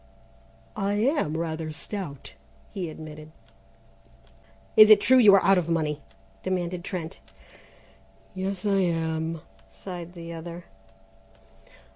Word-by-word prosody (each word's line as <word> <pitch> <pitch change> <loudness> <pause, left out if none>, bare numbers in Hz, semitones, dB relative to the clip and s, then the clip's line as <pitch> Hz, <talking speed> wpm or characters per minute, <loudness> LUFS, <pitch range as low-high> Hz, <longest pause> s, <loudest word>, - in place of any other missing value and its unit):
"I 200 +1 -1
am 215 - +1
rather 160 -1 -3
stout," 155 -3 -7 0.4
he 185 -5 -4
admitted. 155 0 -10 1.4
"Is 215 0 +9
it 215 - +9
true 255 +6 +5
you 205 -5 +8
are 195 - +4
out 195 -1 +5
of 170 -1 -4
money?" 155 -3 -1 0.4
demanded 180 -1 -2
Trent. 175 -3 -5 1.1
"Yes, 190 0 -4
I 200 -1 +2
am," 165 -2 -1 0.3
sighed 175 -2 -8
the 170 -1 -8
other. 170 +1 -8
175 Hz, 110 wpm, -26 LUFS, 160-195 Hz, 1.4 s, Is